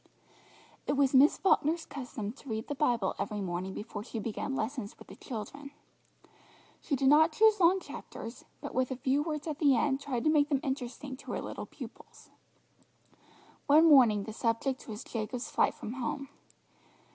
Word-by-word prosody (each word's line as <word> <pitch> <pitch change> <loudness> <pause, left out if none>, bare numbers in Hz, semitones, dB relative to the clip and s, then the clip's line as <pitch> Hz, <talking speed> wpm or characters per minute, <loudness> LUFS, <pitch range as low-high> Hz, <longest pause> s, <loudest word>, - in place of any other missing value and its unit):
It - - +2
was 275 -1 +2
Miss 275 +3 +6
Falkner's 330 -3 +2
custom 240 -6 -5
to 275 - -14
read 220 0 -3
the - - -1
Bible 240 -9 +1
every 210 -2 -2
morning 185 0 -3
before 210 -1 -6
she 230 - -7
began 225 +5 -3
lessons 230 -3 -4
with - - -15
the - - -10
children. 270 +5 -7 1.1
She 285 - -1
did 270 0 +1
not 310 +3 +6
choose 435 +4 +5
long 365 +2 +5
chapters, 230 -9 -9 0.2
but 285 - -6
with 255 0 +1
a 260 - -2
few 265 +3 +1
words 300 -1 -3
at 305 -2 -4
the 285 -4 +5
end 270 +1 +1
tried 255 -4 -2
to 310 - +4
make 295 -1 +3
them 280 -3 +2
interesting 265 0 -4
to - - -7
her - - -2
little - - -6
pupils. - - -12 1.4
One 310 +3 +7
morning 240 -9 +6
the 220 - -7
subject 230 +4 -1
was 215 -2 -6
Jacob's 235 +2 -4
flight - - +2
from 220 - -6
home. 265 +2 -4
265 Hz, 175 wpm, -31 LUFS, 230-290 Hz, 1.4 s, One